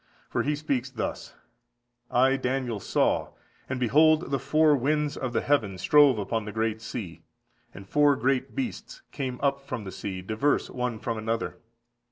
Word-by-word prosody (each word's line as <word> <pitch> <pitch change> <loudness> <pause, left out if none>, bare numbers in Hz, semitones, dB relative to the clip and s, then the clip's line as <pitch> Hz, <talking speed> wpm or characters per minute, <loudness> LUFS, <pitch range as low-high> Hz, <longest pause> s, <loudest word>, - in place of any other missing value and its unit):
For 120 - +1
he 150 +5 0
speaks 140 -4 -2
thus: 125 -3 -5 0.7
"I 130 +2 +4
Daniel 130 -4 -2
saw, - - 0 0.4
and 130 - -2
behold 155 +7 +4
the 135 - +1
four 150 +2 +4
winds 150 +2 0
of 130 -2 -3
the - - 0
heaven 110 -9 +1
strove 135 +7 +5
upon 105 +2 -2
the 105 - -5
great 110 +1 -1
sea. 90 -8 -6 0.5
And 95 +1 -12
four 145 +4 +4
great 130 +1 0
beasts 275 - -5
came 130 -3 -4
up 140 -1 +1
from 130 -5 -5
the 95 - -7
sea, 95 -2 -5
diverse 110 +9 0
one 125 -2 -2
from 115 0 -3
another. 115 +1 -3
130 Hz, 165 wpm, -27 LUFS, 110-145 Hz, 0.7 s, strove